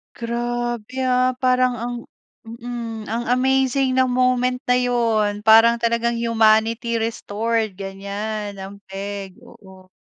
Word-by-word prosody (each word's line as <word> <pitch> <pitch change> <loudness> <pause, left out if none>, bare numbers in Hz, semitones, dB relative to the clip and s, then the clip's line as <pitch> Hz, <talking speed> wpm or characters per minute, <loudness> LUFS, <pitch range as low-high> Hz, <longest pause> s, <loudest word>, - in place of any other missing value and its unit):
Grabe, 240 +1 -3
ah. 255 0 +2
Parang 255 -1 +3
ang 240 +1 -4 0.5
mm. 230 -1 -7
Ang 235 +2 -2
amazing 265 0 +1
na 260 - +4
moment 250 0 +1
na 250 - +5
'yun. 225 -4 0
Parang 225 +2 +6
talagang 235 0 +1
humanity 230 0 +2
restored, 225 -1 -2
ganyan 200 +2 -5
ang 195 +1 -9
peg, 195 0 -6
oo. 190 -1 -16
230 Hz, 115 wpm, -21 LUFS, 215-245 Hz, 0.5 s, Parang